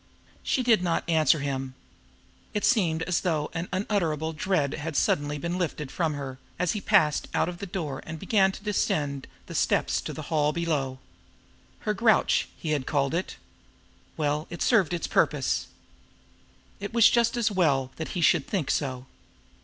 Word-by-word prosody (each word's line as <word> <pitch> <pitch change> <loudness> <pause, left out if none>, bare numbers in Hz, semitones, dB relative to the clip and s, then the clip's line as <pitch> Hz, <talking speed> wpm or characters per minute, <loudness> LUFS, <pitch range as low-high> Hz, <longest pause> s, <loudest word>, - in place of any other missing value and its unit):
She 255 - 0
did 230 -5 +4
not 170 -2 -1
answer 155 -2 +3
him. 135 -2 -3 0.8
It 210 - +1
seemed 170 -9 +2
as 180 +1 0
though 155 -5 -1
an 165 +1 -4
unutterable 170 -6 -1
dread 155 -3 0
had 160 0 -5
suddenly 145 +1 +1
been 170 +5 -3
lifted 150 -5 -3
from 160 -4 -1
her, 135 -2 -6 0.2
as 180 -1 +1
he 210 - -3
passed 185 -10 +3
out - - +2
of 175 -1 -6
the 200 - -5
door 155 -7 -4
and 160 0 -7
began 195 +2 +3
to 200 - -10
descend 145 -9 -1 0.2
the - - -9
steps - - +1
to - - -5
the 155 - -7
hall 150 -1 +2
below. 150 -6 -1 0.8
Her 210 - 0
"grouch," 220 +2 +3
he 160 - -3
had 145 -4 -1
called 140 -1 +1
it. 175 +3 -2 0.8
Well, 150 0 -1
it - - -9
had - - -11
served 200 - +3
its 170 - -3
purpose! - - +1 1.1
It 200 +3 -6
was 230 -2 +7
just 235 +1 +2
as 225 -2 +1
well 140 -9 +2
that 160 - -4
he - - 0
should 160 -2 +3
think 180 -9 -1
so! 130 -3 -2
160 Hz, 175 wpm, -27 LUFS, 145-190 Hz, 1.1 s, was